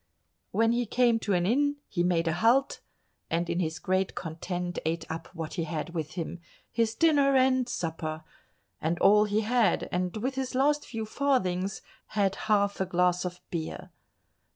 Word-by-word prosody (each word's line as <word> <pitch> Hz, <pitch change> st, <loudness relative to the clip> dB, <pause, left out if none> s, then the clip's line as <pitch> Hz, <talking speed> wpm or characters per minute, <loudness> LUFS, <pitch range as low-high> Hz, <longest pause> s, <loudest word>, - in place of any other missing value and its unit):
When 225 Hz, +1 st, +2 dB
he 240 Hz, 0 st, 0 dB
came 240 Hz, 0 st, +3 dB
to 205 Hz, -, -1 dB
an 175 Hz, -1 st, +2 dB
inn 285 Hz, +7 st, +2 dB
he 175 Hz, -, -2 dB
made 170 Hz, -1 st, +1 dB
a 165 Hz, -, +2 dB
halt, 235 Hz, +10 st, +3 dB, 0.5 s
and 170 Hz, +1 st, 0 dB
in 170 Hz, +1 st, -1 dB
his 160 Hz, -2 st, -1 dB
great 185 Hz, +3 st, 0 dB
content 175 Hz, +2 st, -4 dB
ate 165 Hz, +1 st, -2 dB
up 165 Hz, 0 st, -5 dB
what 165 Hz, -2 st, -5 dB
he 170 Hz, -3 st, -2 dB
had 155 Hz, +1 st, -4 dB
with 155 Hz, -3 st, -4 dB
him—his 185 Hz, +6 st, -4 dB
dinner 285 Hz, -3 st, +4 dB
and 255 Hz, -1 st, +3 dB
supper—and 160 Hz, 0 st, -5 dB
all 210 Hz, +3 st, +5 dB
he 210 Hz, +1 st, +1 dB
had, 225 Hz, -3 st, +2 dB
and 180 Hz, +3 st, -1 dB
with 255 Hz, +5 st, -2 dB
his 265 Hz, -1 st, -3 dB
last 290 Hz, +3 st, +2 dB
few 225 Hz, -2 st, -4 dB
farthings 195 Hz, -7 st, 0 dB, 0.3 s
had 195 Hz, -2 st, +3 dB, 0.2 s
half 200 Hz, -2 st, +2 dB
a -, -, +2 dB
glass 180 Hz, 0 st, +2 dB
of 180 Hz, 0 st, -5 dB
beer. 165 Hz, -2 st, -5 dB
190 Hz, 165 wpm, -28 LUFS, 170-235 Hz, 0.5 s, all